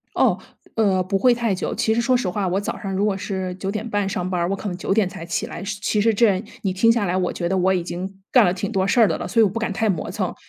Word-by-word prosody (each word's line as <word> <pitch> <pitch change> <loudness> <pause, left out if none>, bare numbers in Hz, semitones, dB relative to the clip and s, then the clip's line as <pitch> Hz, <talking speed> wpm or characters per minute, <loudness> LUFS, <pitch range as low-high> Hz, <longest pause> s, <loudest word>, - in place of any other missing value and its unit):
哦， - - +3 0.4
呃， 195 -4 +2
不 195 +2 -1
会 245 +4 +4
太 230 -4 0
久。 185 - -3
其 220 - +1
实 235 - +1
说 250 +2 +3
实 240 -6 -1
话， 195 +1 -1
我 190 +3 0
早 - - -4
上 195 - -5
如 195 - +1
果 205 -2 +1
是 190 -2 -4
9:30 205 +1 -2
上 180 -2 -2
班 180 -2 -1
儿， 170 - 0
我 195 - 0
可 205 - -5
能 180 - -4
9:00 195 +1 +1
才 165 - -8
起 175 - -2
来。 - - -7
其 205 +1 -1
实 225 +2 +3
这， 205 -3 +3 0.2
你 190 -2 0
听 215 +5 +3
下 230 -2 +2
来 180 -1 0
我 180 -1 0
觉 170 -1 -2
得 190 - 0
我 185 +1 +3
已 180 - 0
经 190 +3 -6
干 250 -4 +7
了 175 - +3
挺 195 +3 -3
多 190 -1 +1
事 235 - +3
儿 225 - +7
的 160 - 0
了， - - -4
所 230 - +2
以 220 - +7
我 195 - +2
不 215 - -3
敢 225 -2 -2
太 220 +3 0
磨 180 -6 -1
蹭。 - - -2
195 Hz, 315 characters per minute, -22 LUFS, 185-215 Hz, 0.4 s, 干